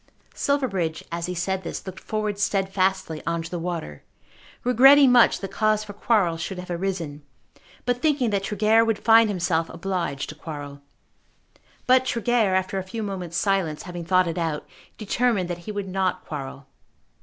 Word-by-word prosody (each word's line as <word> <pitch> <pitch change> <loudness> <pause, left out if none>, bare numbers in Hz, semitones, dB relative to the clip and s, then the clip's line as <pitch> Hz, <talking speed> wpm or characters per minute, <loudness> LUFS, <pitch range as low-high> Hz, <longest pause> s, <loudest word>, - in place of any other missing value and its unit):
Silverbridge 195 - -1
as 170 0 -3
he 180 - -4
said 190 +2 -1
this 170 - -6
looked 190 -1 -7
forward 215 -2 -3
steadfastly 190 -4 0
on 170 0 -1
to 165 - -9
the 175 - -3
water, 165 - -5 0.6
regretting 270 +2 +7
much 245 -1 +5
that 195 -1 -5
cause 215 +1 +1
for 205 -1 -9
quarrel 200 -5 +1
should 180 +3 -5
have 180 0 -7
arisen, 170 -5 -3 0.6
but 245 0 0
thinking 280 -7 +2
that 200 -1 +1
Tregear 215 +2 +3
would 225 -2 0
find 225 0 +5
himself 170 -4 0
obliged 170 -5 -3
to - - -6
quarrel. 145 -2 -8 1.0
But 255 0 +4
Tregear, 230 -5 +1
after 190 +1 0
a - - -4
few 220 +4 -5
moments' 180 -4 -4
silence, 190 -7 0
having 175 -1 -6
thought 185 +1 +3
it 170 +1 -3
out, 160 -3 -2 0.3
determined 215 -4 0
that 175 - -4
he - - -1
would 205 -2 -4
not 190 0 -1
quarrel. 140 -2 -7
190 Hz, 165 wpm, -24 LUFS, 170-215 Hz, 1.0 s, regretting